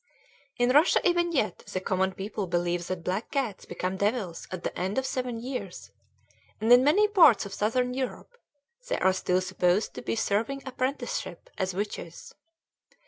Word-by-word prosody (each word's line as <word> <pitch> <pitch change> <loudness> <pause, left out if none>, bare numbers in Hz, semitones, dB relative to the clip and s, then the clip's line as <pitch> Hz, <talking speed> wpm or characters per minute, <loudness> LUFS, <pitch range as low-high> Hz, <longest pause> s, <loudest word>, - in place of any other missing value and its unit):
In 245 +1 +3
Russia 300 +6 +5
even 345 -1 +2
yet 215 - 0
the 185 - -5
common 190 0 0
people 200 +1 -4
believe 175 0 -1
that 185 -2 -4
black 190 +6 -2
cats 255 -8 -2
become 185 +1 -3
devils 200 -4 -2
at 185 -2 -6
the - - -3
end 190 +5 -2
of 265 - +1
seven 250 -3 -3
years, 200 - -6 0.7
and 225 +3 +5
in 245 +1 +7
many 390 +10 +4
parts 330 - +6
of 200 - -8
Southern 250 +5 0
Europe 265 - -5 0.5
they - - 0
are 190 - +3
still 185 -1 +1
supposed 185 +2 +1
to - - -7
be - - -2
serving 225 +5 -1
apprenticeship 275 - -4
as 185 -1 -2
witches. 195 -4 -5
215 Hz, 165 wpm, -27 LUFS, 185-260 Hz, 0.7 s, in